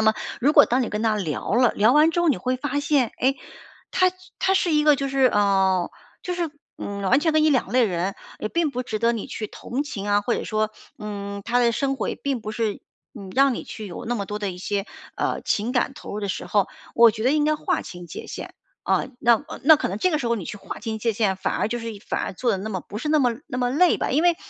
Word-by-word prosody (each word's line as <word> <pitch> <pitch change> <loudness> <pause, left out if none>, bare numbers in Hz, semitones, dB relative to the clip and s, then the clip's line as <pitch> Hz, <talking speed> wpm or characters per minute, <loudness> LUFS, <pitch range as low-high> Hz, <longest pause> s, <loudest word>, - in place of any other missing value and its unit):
那 - - +2
么 220 0 +5 0.3
如 290 +5 +4
果 290 - +8
当 250 +2 +2
你 - - -2
跟 210 +1 -3
她 220 -1 +2
聊 185 +2 -2
了， 245 -1 +5
聊 220 +4 +4
完 305 +2 +5
之 345 - 0
后， 345 - +3
你 280 - +3
会 255 0 -1
发 285 +2 -2
现， 285 -5 +1
诶， 265 +2 +2 0.6
她 370 0 +4 0.3
她 385 - +3
是 350 -3 +2
一 300 - +4
个 300 -2 +5
就 275 0 -2
是， 270 -1 +3
呃， 195 -4 +2 0.3
就 360 - -3
是， 340 -3 -2 0.3
嗯， 200 0 -5
完 250 +9 +3
全 320 -1 +2
跟 310 0 +4
你 310 - +4
两 255 -8 +1
类 250 0 +4
人， 185 0 -1 0.3
也 215 - -2
并 335 0 0
不 250 - -2
值 220 -3 -4
得 235 +1 +2
你 225 - -4
去 215 - -4
同 265 +7 -4
情 205 -7 -5
啊， 205 0 +3
或 235 +3 0
者 - - -2
说， 215 0 -1 0.3
嗯， 200 -1 -6
她 245 +1 +2
的 235 -1 +4
生 270 +4 0
活 230 - -3
也 - - -3
并 275 -4 -2
不 215 - -5
是， 215 -1 -2 0.3
嗯， 195 -4 -9
让 275 -2 +5
你 - - -5
去 215 -2 -8
有 175 - -7
那 240 +1 -1
么 200 - -3
多 210 +1 -5
的 200 - -1
一 180 - -9
些， 200 +1 -2 0.3
呃， - - -1
情 215 +4 0
感 250 +1 +1
投 - - -9
入 - - -3
的 200 - -3
时 - - -3
候， 205 -2 +2 0.3
我 235 -1 +8
觉 220 - -5
得 255 - +3
应 300 0 +2
该 305 0 +3
划 - - -1
清 175 -1 -9
界 - - -8
限， - - -7 0.3
啊。 - - +1 0.2
那 235 +4 +4 0.2
那 315 +3 +8
可 - - -2
能 195 - -3
这 365 - +2
个 305 - +1
时 245 - -3
候 235 - +2
你 195 -6 -5
去 210 - -6
划 - - -8
清 220 -2 -4
界 230 0 0
限， 200 -3 +1
反 - - -2
而 - - 0
就 240 +1 -2
是 230 - -7 0.2
反 - - -2
而 - - -4
做 240 +6 0
得 - - +1
那 210 +3 -5
么 190 -4 -3
不 210 - -8
是 300 - -4
那 305 -1 +4
么 245 -3 +2
那 250 -4 -4
么 245 -1 +1
累 340 +6 +4
吧。 - - -2
因 295 +6 +2
为 345 -1 +4
235 Hz, 300 characters per minute, -24 LUFS, 205-280 Hz, 0.6 s, 果